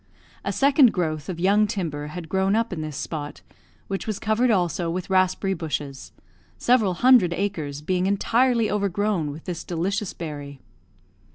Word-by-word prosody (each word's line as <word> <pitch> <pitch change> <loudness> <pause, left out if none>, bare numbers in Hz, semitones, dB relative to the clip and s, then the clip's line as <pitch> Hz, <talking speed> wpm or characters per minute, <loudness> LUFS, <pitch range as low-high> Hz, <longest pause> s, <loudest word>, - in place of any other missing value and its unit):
A - - -1
second 275 -3 +5
growth 155 -2 -2
of 175 -2 -4
young 205 +4 +3
timber 155 -8 -3
had 165 +2 -7
grown 190 +4 +1
up 230 -2 0
in 160 - -4
this 155 -2 -5
spot, 150 -2 -5 0.5
which 195 +2 -4
was 215 -3 -2
covered 220 +3 +1
also 175 -4 +1
with 180 +2 -4
raspberry 185 +1 +2
bushes 145 -5 -5 0.5
several 220 -7 +2
hundred 240 -6 +5
acres 155 -7 -3
being 185 +3 0
entirely 230 +3 +2
overgrown 200 -4 0
with 150 +3 -8
this 175 -3 -5
delicious 190 +4 -2
berry. 145 -4 -7
185 Hz, 155 wpm, -24 LUFS, 160-210 Hz, 0.5 s, second